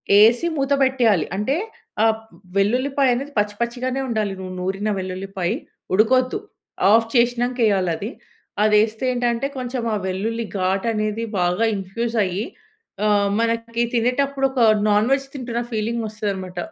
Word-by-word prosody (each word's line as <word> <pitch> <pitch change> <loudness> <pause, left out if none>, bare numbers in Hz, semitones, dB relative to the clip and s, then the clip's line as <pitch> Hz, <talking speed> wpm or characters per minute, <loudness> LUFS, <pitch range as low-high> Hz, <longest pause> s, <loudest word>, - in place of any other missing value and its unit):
యెసి 230 +10 +6
మూత 275 0 -1
పెట్టేయాలి. 235 - +3
అంటే 210 +8 0 0.5
ఆహ్, 220 -1 +3 0.4
వెల్లుల్లిపాయ‌‌నేది 255 +5 +1
పచ్చి 205 0 +1
పచ్చిగానే 250 +3 -2
ఉండాలి, 215 -4 -1
నూ 185 - -6
నూరిన 195 +3 -2
వెల్లుల్లిపాయ. 185 0 -3 0.4
ఉడుకొద్దు. 255 - +3 0.5
ఆఫ్ 225 +2 +5
చేసినాక 245 0 +2
వేయాలి 195 -4 +2
అది. 210 +6 -5 0.5
అది 215 0 +4
వేస్తే 220 +3 0
ఏంటంటే, 245 +1 0
కొంచెం 250 -1 -3
ఆ - - +1
వెల్లుల్లి 220 +5 -2
ఘాటు 190 +3 0
అనేది 215 +1 -1 0.2
బాగా 180 +5 +2
ఇన్‍ఫ్యూజ్ 225 +5 -3
అయ్యి, 190 +4 -2 0.6
ఆహ్, 205 -1 +3
మనకి 230 0 0
తినేటప్పుడు 270 +3 +1
ఒక 265 - -3 0.3
నాన్‍వెజ్ 245 +7 +2
తింటున్న 240 -2 -3
ఫీలింగ్ 230 +1 -1
వస్తుందన్నమాట. 195 -4 -4
225 Hz, 130 wpm, -22 LUFS, 200-245 Hz, 0.6 s, యెసి